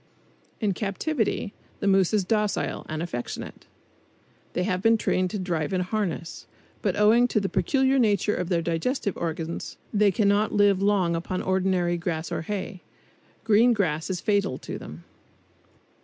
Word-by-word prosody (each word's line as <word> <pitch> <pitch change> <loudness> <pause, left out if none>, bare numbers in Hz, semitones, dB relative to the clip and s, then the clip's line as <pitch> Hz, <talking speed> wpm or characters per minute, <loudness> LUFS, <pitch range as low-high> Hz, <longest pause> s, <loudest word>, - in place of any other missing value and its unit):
In 210 -4 +1
captivity 215 - -2 0.3
the - - -3
moose 195 -2 +4
is 210 -3 +2
docile, 210 0 -1
and 155 +1 -3
affectionate. 120 -8 -6 0.9
They 180 - 0
have 180 -1 0
even 225 +4 +4
been - - +3
trained 185 -3 0
to 210 - -4
drive 170 -4 -2
in 185 - +1
harness. 180 -3 -3 0.3
But 195 -4 0
owing 225 +4 +5
to 220 - +1
the 195 - -1
peculiar 270 -5 +2
nature 210 -3 +2
of 180 -1 -3
their 170 -3 +1
digestive 195 - -1
organs, 165 0 -4 0.2
they 210 -1 +4
cannot 205 +1 +2
live 200 -2 +4
long 195 -4 +2
upon 180 +2 -3
ordinary 185 -2 +1
grass 165 -2 -3
or - - -2
hay. 190 +1 -5 0.6
Green 225 +2 +5
grass 160 -7 -1
is 185 -2 -2
fatal 200 -11 +1
to - - -7
them. 80 +3 -10
195 Hz, 155 wpm, -26 LUFS, 175-210 Hz, 0.9 s, owing